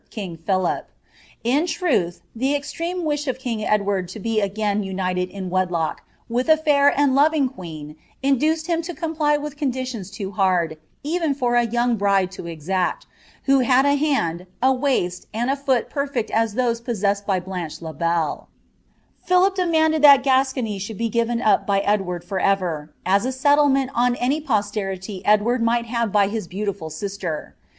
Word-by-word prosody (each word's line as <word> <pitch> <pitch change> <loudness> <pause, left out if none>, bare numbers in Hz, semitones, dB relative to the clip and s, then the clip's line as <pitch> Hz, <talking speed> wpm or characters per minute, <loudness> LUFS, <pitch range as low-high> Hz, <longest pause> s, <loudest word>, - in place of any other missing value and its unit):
king 190 -6 -6
Philip. 185 +2 -1 0.5
In 280 +9 +2
truth, 260 - 0
the 265 +5 +1
extreme 335 +5 -3
wi»h 295 -2 -1
of 260 - -1
king 240 -5 -3
Edward 200 -3 0
to 185 +5 -8
be 220 +1 0
ipis 205 +1 -1
united 185 -1 -2
in 190 -2 -6
wedlock 180 -4 -1 0.3
with 245 +5 -1
a 315 0 +6
lair 285 -1 +5
and 285 -2 +3
loving 290 0 +3
queen 160 - -9 0.3
induced 305 +4 +2
him 335 -1 0
to 345 +1 -7
comdr 310 -3 0
with 295 0 -6
rondilions 255 -8 -3
loo 195 -1 -4
hard, 180 -5 +1 0.2
even 320 -1 0
for 245 -3 0
a 240 -1 +3
young 240 0 +1
bride 195 -2 +2
to 185 -2 -8
exact, 175 +3 -2 0.4
who 275 0 +4
hta 255 +2 +4
j 285 0 +3
hand, 185 - 0
a 260 +2 +4
waist, 250 -10 -1
and 240 +4 0
a - - +1
fool 270 -3 +1
perfect 280 -6 -2
as 225 -2 +1
those 235 -2 0
possessed 205 -4 -1
by 190 -2 +2
Blanche 180 -3 -6
In 160 -2 -7
Belk 165 -1 -1 0.8
Philip 365 +2 +3
demanded 320 -4 +2
thai 285 -1 +9
Gascony 260 -5 +1
should 200 +2 -6
be 230 0 -1
given 235 +1 0
up 215 - +3
by 200 -1 +2
Edward 190 -4 -1
fvcrvBi 185 -5 0 0.2
as 195 +2 +3
a 260 - 0
settlement 275 0 +3
on 245 0 +2
any 270 +6 0
posterity 205 -6 -2
Edward 215 +4 +3
might 235 +1 +1
have 235 -2 -1
by 200 -1 +4
his 210 -2 -4
bMuAil 195 -4 -4
sister. 180 -1 -5
230 Hz, 170 wpm, -22 LUFS, 190-275 Hz, 0.8 s, thai